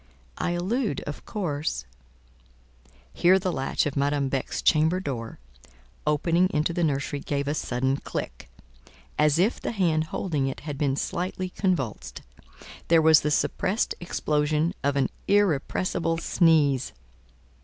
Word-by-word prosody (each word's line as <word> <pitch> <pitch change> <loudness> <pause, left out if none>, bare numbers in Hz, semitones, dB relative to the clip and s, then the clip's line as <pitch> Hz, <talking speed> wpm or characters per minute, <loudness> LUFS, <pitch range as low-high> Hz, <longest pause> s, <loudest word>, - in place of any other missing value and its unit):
I 175 - 0
allude, 195 - -1
of 145 - -7
course—" 150 - -3 1.3
Here 180 +2 +5
the 185 -1 -1
latch 135 -4 -1
of 145 - -2
Madame 140 -1 +1
Beck's 135 -1 -3
chamber 160 +4 +3
door 120 -10 -5 0.7
(opening 170 +4 +2
into 155 +3 0
the 175 - 0
nursery) 140 -1 -1
gave 140 0 -2
a 145 - +1
sudden 130 -2 -1
click, - - -6 0.7
as 150 0 +4
if 195 +7 +1
the - - -3
hand 165 -6 +1
holding 155 -4 -2
it 135 - -5
had 145 -1 -5
been 140 -3 +1
slightly 185 +4 -3
convulsed; 180 - -2 0.6
there 165 0 +5
was 160 -1 +6
the 150 - 0
suppressed 195 +7 0
explosion 155 -1 0
of 140 0 +1
an 140 - +2 0.2
irrepressible 175 -3 +1
sneeze. 155 -6 +2
155 Hz, 135 wpm, -26 LUFS, 140-175 Hz, 1.3 s, was